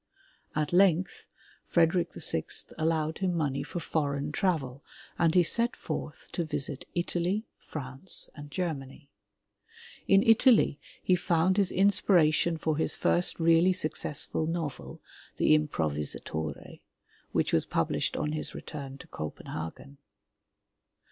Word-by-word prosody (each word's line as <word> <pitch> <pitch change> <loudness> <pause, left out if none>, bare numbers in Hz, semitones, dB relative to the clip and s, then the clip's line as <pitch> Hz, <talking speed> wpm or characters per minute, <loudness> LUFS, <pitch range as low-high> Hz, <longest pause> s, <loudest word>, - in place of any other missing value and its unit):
At 150 +1 -1
length, 185 -1 +3 0.4
Frederick 170 +1 +2
VI 80 - 0 0.3
allowed 160 0 0
him 185 -2 0
money 145 -4 -1
for 175 - -5
foreign 145 -3 -2
travel, 145 -7 -1 0.4
and 165 -1 +3
he 180 - +6
set 235 +8 +2
forth - - -6
to 175 - -1
visit 145 -3 -1
Italy, 175 +4 -1 0.2
France 135 +3 -5
and 145 -1 -10
Germany. 140 -4 -5 1.0
In 195 +1 +5
Italy 225 - +5 0.2
he 185 - +4
found 175 +1 +1
his 200 -3 +2
inspiration 175 -4 +3
for 155 -1 -1
his 160 - +1
first 175 0 +2
really 165 +2 +4
successful 155 -2 -1
novel, 165 -4 -4 0.4
The - - +4
Im 155 0 +3
provisatorCy 75 - -4 0.5
which - - 0
was - - +2
published - - 0
on 150 0 -1
his 155 0 -3
return 140 -3 -7
to - - -12
Copenhagen. 80 - -7
160 Hz, 120 wpm, -29 LUFS, 145-180 Hz, 1.0 s, he